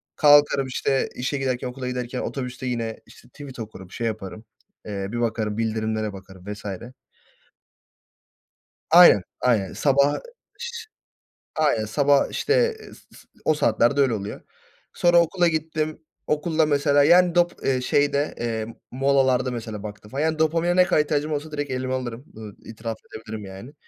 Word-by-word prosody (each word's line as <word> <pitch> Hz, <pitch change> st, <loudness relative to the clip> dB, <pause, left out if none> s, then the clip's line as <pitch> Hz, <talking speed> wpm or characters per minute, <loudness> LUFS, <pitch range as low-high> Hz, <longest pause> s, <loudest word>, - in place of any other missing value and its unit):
Kalkarım, 145 Hz, -2 st, +5 dB
işte, 135 Hz, +1 st, 0 dB
işe 130 Hz, +3 st, -2 dB
giderken 130 Hz, -2 st, -2 dB
okula 125 Hz, 0 st, -6 dB
giderken 125 Hz, 0 st, -4 dB
otobüste 125 Hz, -1 st, -5 dB
yine, 115 Hz, -3 st, -3 dB
işte, -, -, -18 dB
tweet 135 Hz, 0 st, -11 dB
okurum, 95 Hz, -5 st, -9 dB
şey 115 Hz, -, -3 dB
yaparım. 110 Hz, 0 st, -6 dB, 0.4 s
Eee, 100 Hz, -2 st, -4 dB
bir 120 Hz, -, -3 dB
bakarım, 110 Hz, -2 st, -1 dB
bildirimlere 110 Hz, -1 st, -1 dB
bakarım 95 Hz, -1 st, -13 dB
vs. 105 Hz, -, -13 dB, 2.2 s
Aynen, 170 Hz, -, +8 dB, 0.2 s
aynen. 110 Hz, -7 st, +1 dB
Sabah 140 Hz, 0 st, +2 dB, 0.4 s
ş 475 Hz, -1 st, -6 dB, 0.7 s
Aynen 145 Hz, -8 st, +1 dB
sabah, 140 Hz, +5 st, +2 dB
işte, 440 Hz, -, 0 dB, 0.3 s
eee, -, -, -13 dB
s -, -, -15 dB, 0.2 s
s -, -, -17 dB, 0.2 s
o 155 Hz, -, +4 dB
saatlerde 140 Hz, -1 st, +2 dB
öyle 130 Hz, -4 st, +3 dB
oluyor. 105 Hz, -1 st, -5 dB, 0.5 s
Sonra 175 Hz, 0 st, +4 dB
okula 175 Hz, +1 st, +1 dB
gittim 155 Hz, -1 st, -2 dB, 0.3 s
okulda 155 Hz, +1 st, +1 dB
mesela. 145 Hz, -1 st, +3 dB
Yani 175 Hz, +3 st, +5 dB
dop 175 Hz, 0 st, +3 dB
eee, 130 Hz, -2 st, +1 dB
şeyde, 145 Hz, +2 st, +1 dB
eee, 110 Hz, -2 st, -2 dB, 0.2 s
molalarda 130 Hz, -1 st, +2 dB
mesela 110 Hz, -4 st, -6 dB
baktım 105 Hz, 0 st, -9 dB
falan. 135 Hz, +2 st, -2 dB
Yani 160 Hz, 0 st, 0 dB
dopamine 165 Hz, +2 st, +2 dB
ne 180 Hz, 0 st, +6 dB
kadar 180 Hz, -4 st, +3 dB
ihtiyacım 150 Hz, +1 st, -1 dB
olursa 150 Hz, +1 st, -3 dB
direkt 145 Hz, -2 st, -4 dB
elime 130 Hz, 0 st, -2 dB
alırım, 125 Hz, 0 st, -4 dB
ııı, 110 Hz, -2 st, -9 dB
itiraf 115 Hz, 0 st, -6 dB
edebilirim 110 Hz, -1 st, -8 dB
yani. 95 Hz, +8 st, -10 dB
130 Hz, 150 wpm, -24 LUFS, 110-150 Hz, 2.2 s, Aynen